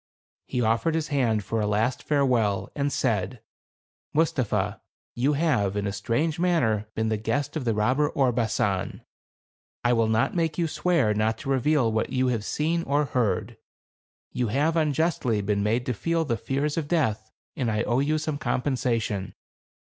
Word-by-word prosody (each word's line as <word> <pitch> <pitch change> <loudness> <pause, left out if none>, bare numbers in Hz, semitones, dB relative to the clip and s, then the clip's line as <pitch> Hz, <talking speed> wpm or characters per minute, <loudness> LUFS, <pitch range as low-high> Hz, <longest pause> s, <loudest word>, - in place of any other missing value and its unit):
He 125 - -1
offered 115 +9 +1
his 160 -1 -1
hand 120 -7 +1
for 115 +3 -2
a 105 - 0
last 110 +5 0
farewell, 125 -9 +1
and 145 0 0
said, 120 -4 -1 0.8
"Mustapha, 110 - 0 0.3
you 130 +5 +1
have, 120 - +1
in 100 - -1
a 100 - -2
strange 120 - -1
manner, 115 - +1
been 110 0 0
the 110 - 0
guest 115 +9 -2
of 150 -5 -3
the 115 -2 +1
robber 130 +8 +2
Orbasan. 115 -7 0 0.8
I 120 0 +3
will 115 -1 +2
not 110 +1 +1
make 165 -3 0
you 170 -2 +1
swear 165 -9 +1
not 110 +1 0
to 140 -5 -4
reveal 135 -2 +2
what 110 0 -1
you 130 0 +1
have 115 -4 -1
seen 160 +8 0
or 145 +2 +1
heard. 110 -2 0 0.7
You 125 -1 -1
have, 145 +9 +1
unjustly, 150 -7 +1
been 100 0 0
made 115 +4 0
to 125 - -1
feel 165 +8 -1
the 120 -5 0
fears 140 +6 -2
of 155 -3 -1
death, 110 -10 0 0.2
and 125 -4 -1
I 110 +1 0
owe. 120 +2 +1
you 150 +3 +1
some 155 -2 -3
compensation. 120 -6 -1
125 Hz, 170 wpm, -26 LUFS, 110-150 Hz, 0.8 s, I